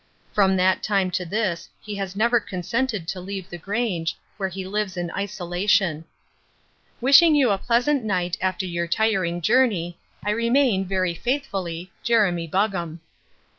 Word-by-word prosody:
From 190 -2 +3
that 185 0 +2
time 195 -3 +1
to 180 0 -2
this 190 -2 -2
he 210 - -7
has 195 -1 -4
never 235 +3 +3
consented 215 +1 -2
to 190 - -3
leave 190 0 -6
the 175 - -7
Grange, 195 -4 -2 0.2
where 190 -2 -2
he 190 +1 -6
lives 200 -1 -2
in 175 -1 -3
isolation. 180 -3 0 0.9
"Wishing 280 +6 +7
you 265 -6 +4
a 195 - +1
pleasant 245 +5 +1
night 180 -4 -1
after 185 0 -1
your 170 -1 -2
tiring 185 -3 0
journey, 190 -5 +2 0.3
"I 210 - +1
remain, 230 -2 +2
"Very 185 -2 0
faithfully, 190 - -3
"Jeremy 195 -8 +2
Buggam." 175 -3 -1
195 Hz, 145 wpm, -23 LUFS, 175-220 Hz, 0.9 s, Wishing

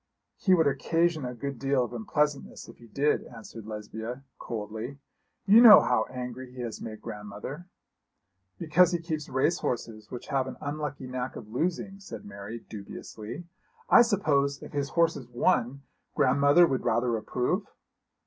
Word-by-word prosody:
'He 190 -2 +3
would 160 - +3
occasion 160 +2 +1
a 125 0 -5
good 140 0 -5
deal 135 -2 +2
of 120 - -6
unpleasantness 145 +5 -2
if - - -13
he 120 - -15
did,' 145 +6 +1
answered 115 -2 -11
Lesbia, 110 +4 -6 0.2
coldly. 110 +4 -5 0.5
'You 210 +4 +8
know 225 -4 +11
how 125 -3 +1
angry 125 0 -6
he 125 0 -8
has 115 -3 -5
made 110 -1 -8
grandmother.' 105 - -7 0.9
'Because 170 - +3
he - - +2
keeps 160 -3 -5
race 130 +6 +1
horses 110 -3 -4
which 125 - -8
have 135 -1 0
an 130 - -7
unlucky 145 -2 -4
knack 125 0 -4
of 105 - -9
losing,' 180 - -2
said 195 - -9
Mary, 100 +3 -8
dubiously. 110 - -8 0.5
'I - - +9
suppose 145 -11 +1
if - - -9
his 140 -1 -1
horses 160 -6 +1
won, 125 +2 0 0.3
grandmother 145 +4 +5
would 135 -5 -1
rather 120 +1 +1
approve?' 125 - -1
130 Hz, 155 wpm, -28 LUFS, 115-150 Hz, 0.9 s, know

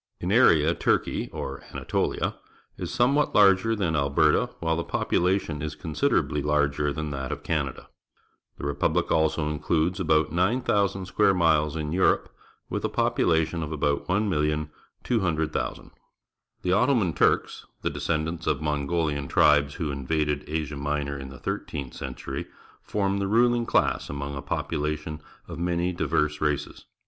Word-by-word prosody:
In - - -2
area - - +5
Turkey, - - 0
or 70 0 -5
Anatolia, - - -1 0.4
is - - -5
somewhat 140 +5 +2
larger 100 +2 +5
than 90 -6 -1
Mberta, 70 -2 +2
while 80 -1 0
the 85 - -2
population 90 -5 0
is 75 0 -4
considerably 75 0 0
larger 75 0 +1
than 75 0 -4
that 65 -2 -4
of - - -5
Canada. - - -2 0.7
The - - -9
repubhc 70 0 0
also 80 -1 +2
includes 80 +4 0
about 80 -3 +2
9,000 100 0 +1
square 95 +1 +3
miles 80 -3 +2
in 75 -1 -3
Europe, 95 +3 +2 0.3
with - - -3
a - - 0
population 80 +1 +1
of 75 -1 -4
about 75 -2 -1
1,200,000. 80 - -1 0.7
The 90 - +1
Ottoman 100 - +3
Turks, - - +1 0.2
the - - 0
descendants 80 +1 -2
of 70 - +1
Mongohan 75 -1 -1
tribes 70 -1 +4
who 80 -5 -2
invaded 75 +2 -1
Asia 75 -2 -3
Minor 70 0 -2
in 65 -1 -7
the^thirteenth 65 -1 -5
century, 65 - -6 0.3
form 100 -1 -1
the 100 - 0
ruHng 120 +2 +3
class - - +1
among 70 0 -4
a 70 - -5
population 75 +1 -3 0.3
of - - -7
many 85 +1 0
diverse 75 -3 0
races. 75 -1 -2
80 Hz, 135 wpm, -26 LUFS, 75-90 Hz, 0.7 s, area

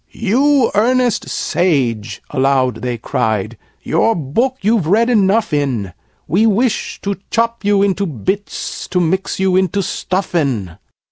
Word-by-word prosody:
"You 260 +4 +2
earnest 245 +2 +1
Sage!" 120 - -1
aloud 130 -2 +1
they 125 -1 -3
cried, 110 -3 -2 0.3
"your 225 - +2
book 230 - -1
you've 205 -4 +1
read 230 +7 +3
enough 210 -3 +2
in! 125 - -1 0.3
We 205 +8 +3
wish 225 +2 0
to 200 -1 -2
chop 230 0 0
you 200 -1 +3
into 200 0 0
bits 185 - -4
to 180 - 0
mix 185 +3 -1
you 190 -1 +2
into 190 +1 +1
Stuffin'!" 140 - -2
190 Hz, 130 wpm, -17 LUFS, 135-220 Hz, 0.3 s, read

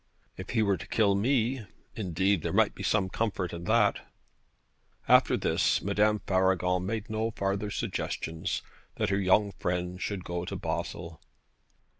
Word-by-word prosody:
If 95 - -8
he 110 -2 +2
were 100 -2 +2
to - - -9
kill 105 -3 +3
me, 120 +1 +1 0.3
indeed, 95 -2 +1
there - - -2
might - - +3
be - - -9
some 105 -3 +1
comfort 95 -3 -2
in 85 0 -6
that.' 105 0 +3 1.1
After - - +5
this - - +2
Madame 105 +1 +2
Faragon 95 -1 +2
made 110 +1 -3
no 110 0 -1
farther 100 -1 -2
suggestions 80 -4 -3 0.3
that 110 -1 0
her 100 0 +1
young 100 +2 +3
friend 90 +1 -2
should 100 -3 -3
go 85 0 -3
to - - -5
Basle. 85 -2 -4
100 Hz, 150 wpm, -29 LUFS, 90-105 Hz, 1.1 s, After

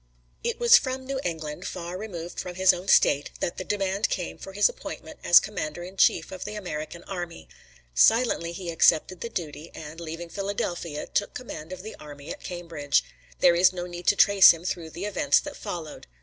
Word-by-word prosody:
It 470 0 -2
was 475 0 +8
from 260 -1 -4
New 270 0 -3
England, 155 -3 -4
far 175 0 -6
removed 175 -4 -6
from 180 -1 -5
his 190 0 +5
own 180 +2 -7
State, 140 +1 +4
that 170 - -2
the - - -4
demand 195 +1 -1
came 180 -3 -4
for 195 - -9
his 205 +1 +5
appointment 160 - -8
as 175 - +8
commander 175 -5 -5
in 185 +2 -9
chief - - +3
of 185 -1 -6
the 210 - -6
American 170 -3 -6
army. 175 -3 -6 0.5
Silently 225 - +3
he 170 0 -5
accepted 165 +2 +3
the 235 - -4
duty, 165 -4 -6
and, 155 +1 -9
leaving 170 +1 -7
Philadelphia, 175 -5 -3
took 205 - -2
command 165 -10 -7
of 185 0 -7
the 220 - -8
army 145 +1 -10
at - - -7
Cambridge. 165 -5 -1 0.4
There 175 -1 +6
is 180 +2 +5
no 175 -1 -4
need 175 0 -8
to - - +5
trace 200 -1 +8
him 165 0 +3
through 170 -3 -3
the 175 +5 -6
events 145 -9 +3
that - - -8
followed. 160 -3 -7
175 Hz, 195 wpm, -26 LUFS, 165-195 Hz, 0.5 s, was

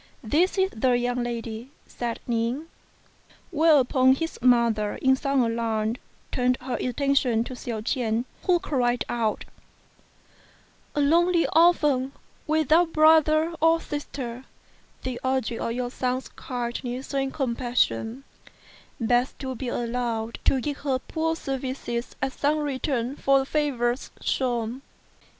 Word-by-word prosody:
"This 325 - +2
is 380 0 +2
the 250 +3 +1
young 245 0 -1
lady," 235 0 -4 0.2
said 235 -1 -4
Ning; 235 +5 -1 0.9
whereupon 275 -5 +4
his 325 +3 -4
mother 235 -4 +3
in 265 0 +3
some 275 -1 +1
alarm 230 -1 -1 0.3
turned 250 0 +1
her 255 0 -4
attention 255 -3 +1
to 255 - -7
Hsiao 235 -3 -5
ch'ien, 230 0 -1 0.2
who 360 -1 +5
cried 250 -8 0
out, 225 -3 -1 1.5
"A 295 - +2
lonely 340 +4 +4
orphan, 295 -6 +4 0.3
without 315 +2 +3
brother 315 +1 +5
or 325 +1 +5
sister, 265 -5 -6 0.6
the 255 -2 -4
object 260 -3 -1
of - - -1
your 245 0 -3
son's 255 0 -2
kindness 245 +1 -5
and 270 -1 0
compassion, 245 - -1 0.8
begs 245 +2 +1
to 265 -1 -4
be 255 +1 -5
allowed 235 -1 -2
to 270 - +3
give 285 +2 -3
her 275 -3 0
poor 325 +4 -2
services 260 -4 -4
as 265 0 -1
some 295 +2 +1
return 270 -3 -2
for 275 -2 +3
favours 265 -4 0
shewn." 240 -1 -1
255 Hz, 125 wpm, -25 LUFS, 240-290 Hz, 1.5 s, who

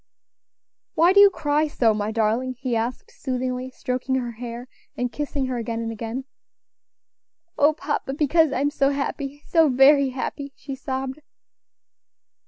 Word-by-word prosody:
"Why 345 +3 +5
do 400 - +6
you 405 0 +9
cry 305 -4 0
so, 235 -6 +2
my 210 0 -2
darling?" 230 +4 0
he 255 -2 -2
asked, 240 - -3
soothingly, 255 - -3
stroking 255 +1 -2
her 245 -2 -2
hair, 235 +1 -7 0.3
and 245 -1 -1
kissing 285 +1 -3
her 255 -1 -2
again 230 -1 -3
and 225 0 -3
again. 230 +4 -5 1.3
"O 295 +2 +4
papa! 295 -3 -3
because 310 +1 +3
I - - -1
am 285 +1 +1
so 275 -2 +2
happy, 280 0 -4
so 325 -3 +4
very 270 +2 +5
happy," 275 +2 -5
she 275 - -8
sobbed. 265 +1 -4
265 Hz, 150 wpm, -23 LUFS, 245-290 Hz, 1.3 s, you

